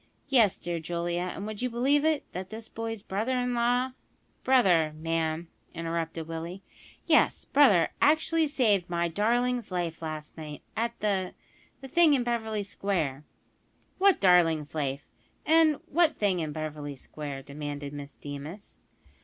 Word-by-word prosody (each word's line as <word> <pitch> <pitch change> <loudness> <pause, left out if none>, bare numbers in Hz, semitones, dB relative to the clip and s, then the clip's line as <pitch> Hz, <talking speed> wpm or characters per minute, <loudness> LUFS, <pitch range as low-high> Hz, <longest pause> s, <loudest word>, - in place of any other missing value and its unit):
"Yes, 230 -8 +4
dear 170 -1 -3
Julia, 175 +2 -2
and, 195 - -5
would 215 0 -6
you 250 - 0
believe 270 +5 +2
it, 315 -2 +2
that 185 +1 -6
this 220 0 -7
boy's 225 -2 -5
brother 220 +7 -1
in 250 0 0
law 245 +2 +1 0.3
" - - -41
"Brother, 180 -12 +4
ma'am," 165 +1 -1 0.3
interrupted 165 -1 -3
Willie. 165 +4 -6 0.4
"Yes, - - +3
brother, 210 - +5
actually 315 +1 +3
saved 210 - +2
my 170 0 0
darling's 240 +6 0
life 170 -3 -3
last 155 -1 -6
night, 150 -2 -8
at 230 +1 -2
the 195 -3 0 0.5
the 270 - -8
thing 320 +1 +5
in 255 - +1
Beverly 220 -3 -1
Square." 165 -8 -2 0.7
"What 390 -1 +5
`darling's 165 -5 +4
life,' 140 -2 -2 0.4
and 320 -1 +5
what 340 +1 +2
`thing' 195 -4 +1
in 155 -2 -2
Beverly 150 -2 -5
Square?" 140 0 -7
demanded 145 0 -6
Miss 140 -1 -8
Deemas. 145 +8 -9
185 Hz, 145 wpm, -28 LUFS, 160-240 Hz, 0.7 s, brother